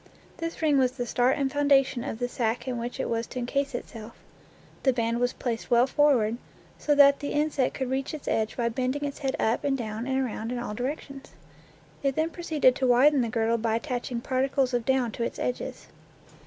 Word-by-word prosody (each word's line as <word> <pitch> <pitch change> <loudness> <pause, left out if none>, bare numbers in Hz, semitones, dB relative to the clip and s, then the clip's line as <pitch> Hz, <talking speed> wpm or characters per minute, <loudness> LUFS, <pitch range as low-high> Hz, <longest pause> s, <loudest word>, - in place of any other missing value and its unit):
This 330 0 -5
ring 295 -3 +4
was 255 -1 +2
the 245 -2 -3
start 245 +2 +2
and 275 -2 0
founda 285 -1 +4
tion 255 -2 -5
of 260 -4 -4
the 245 +1 -1
sack 240 0 -2
in 245 -2 -2
which 240 +1 -5
it - - -1
was 230 0 -2
to - - -9
incase 275 +2 -1
itself. 225 -2 -7 0.7
The 265 - +3
band 230 -1 0
was 245 0 +1
placed 230 -2 -4
well 240 +1 +5
forward, 260 -6 +2 0.4
so 295 - +2
that 280 -1 +7
the 285 - -4
in 300 +1 +1
sect 260 -3 0
could 260 -2 -3
reach 270 +1 -1
its 300 - -10
edge 220 0 0
by 235 -2 +1
bending 260 +4 -2
its 280 - -5
head 270 -2 -1
up 225 +2 +1
and 275 -1 +1
down 225 0 -4
and 265 0 0
around 230 -3 -3
in 250 - -2
all 240 -3 -4
directions. 275 +3 -5 0.7
Then 275 0 0
it 320 +1 0
proceeded 310 -7 +2
to 260 - +1
widen 265 +3 +5
the 235 - -1
girdle 230 0 +1
by 225 0 0
attaching 245 -1 -3
particles 260 0 0
of 240 -2 0
down 260 -3 +1
to 235 - -4
its - - -3
edges. 250 - -4
255 Hz, 220 wpm, -27 LUFS, 235-275 Hz, 0.7 s, that